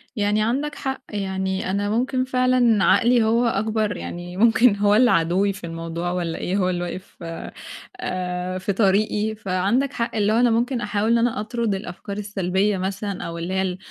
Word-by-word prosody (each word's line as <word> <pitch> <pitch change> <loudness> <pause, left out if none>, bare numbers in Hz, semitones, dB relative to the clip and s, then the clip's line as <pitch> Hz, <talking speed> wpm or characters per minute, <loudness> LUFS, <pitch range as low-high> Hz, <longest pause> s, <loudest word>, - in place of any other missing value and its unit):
يعني 210 -1 +1
عندك 280 +6 -1
حق، 265 -1 -4
يعني 190 -2 -2
أنا 205 +1 -1
ممكن 255 +3 0
فعلًا 255 -5 +3
عقلي 240 -1 +4
هو 230 +2 +2
أكبَر 215 -1 0
يعني 175 +1 -7
ممكن 230 0 +5
هو 205 0 +3
اللي 245 +1 +5
عدوّي 180 +5 +2
في 190 - -12
الموضوع 165 +1 -4
والَّا 170 -2 -2
إيه، 190 +3 -2
هو 185 -2 +1
اللي 175 -1 -2
واقف 185 +2 -7 0.8
آآ، 180 - -3
في 190 +2 -2
طريقي 210 +2 +1
فعندك 210 +7 0
حق 235 -1 -2
اللي 210 0 +2
هو - - +3
أنا 245 0 +4
ممكن 235 +2 0
أحاول 210 +1 0
إن 235 - +5
أنا 230 -1 +1
أطرد 220 -1 -1
الأفكار 195 +1 -7
السلبية 200 0 0
مثلًا، 195 +1 -3
أو 170 0 -5
اللي 170 +3 -4
هي 190 - +1
ال 185 -1 -2
205 Hz, 180 wpm, -23 LUFS, 185-230 Hz, 0.8 s, ممكن